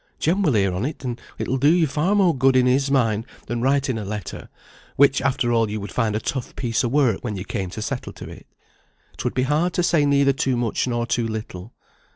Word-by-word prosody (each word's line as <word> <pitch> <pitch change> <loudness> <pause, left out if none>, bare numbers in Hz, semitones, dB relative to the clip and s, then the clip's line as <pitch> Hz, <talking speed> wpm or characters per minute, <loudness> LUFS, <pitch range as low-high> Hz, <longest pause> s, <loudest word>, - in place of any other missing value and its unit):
Jem 180 +6 +1
will 155 -9 +2
hear 100 -4 +2
on't, 130 - -4
and 120 -1 -4 0.2
it - - -3
will 130 +1 -1
do 145 +4 +5
you 170 -1 +4
far 155 +7 0
more 185 -6 +3
good 130 0 +3
in 130 -1 +4
his 135 +2 +2
mind 115 -6 +1 0.2
than 120 -1 -3
writing 135 -2 +1
a - - -5
letter, 105 -3 -6 0.5
which, 140 -1 +4
after 130 -2 0
all, 115 -2 +2
you 105 +1 -3
would 100 - -7
find 110 -4 0
a - - 0
tough 130 +2 -4
piece 115 -2 -1
of 120 - -1
work 130 -8 +2
when 110 -4 -3
you 95 0 -6
came 95 -5 -3
to 110 +4 -6
settle 125 +2 -4
to - - -10
it. - - -12 0.7
'Twould - - -3
be 130 - +1
hard 155 +6 +1
to 180 - 0
say 170 -3 +3
neither 140 -1 +3
too 130 -1 0
much 120 +1 -1
nor 120 -1 -1
too 120 0 -1
little. 110 -1 -7
125 Hz, 235 wpm, -22 LUFS, 110-140 Hz, 0.7 s, do